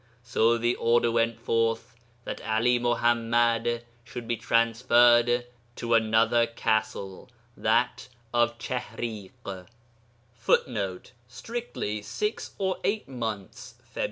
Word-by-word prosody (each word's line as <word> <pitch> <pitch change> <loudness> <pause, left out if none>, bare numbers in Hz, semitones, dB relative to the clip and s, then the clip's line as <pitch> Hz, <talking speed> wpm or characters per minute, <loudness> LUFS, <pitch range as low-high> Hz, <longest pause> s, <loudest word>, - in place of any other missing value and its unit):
So 120 -1 +2
the 120 +1 +1
order 120 0 +3
went 115 0 +1
forth 115 +1 0 0.3
that - - -6
'Ali 115 +3 +2
Muḥammad 120 0 +1 0.2
should 120 -1 -8
be 120 - 0
transferred 120 +1 +4 0.3
to 115 0 -2
another 115 +1 +3
castle 110 -2 -2 0.3
that 115 +4 +1 0.3
of 120 0 +2
Chihriḳ. 105 -6 -6 0.7
[Footnote: 110 -5 -1 0.2
Strictly, 130 - -5
six 210 - -4
or 190 -1 -1
eight 210 +1 -1
months 110 -7 -6 0.2
(Feb. - - -6
115 Hz, 100 wpm, -27 LUFS, 115-120 Hz, 0.7 s, transferred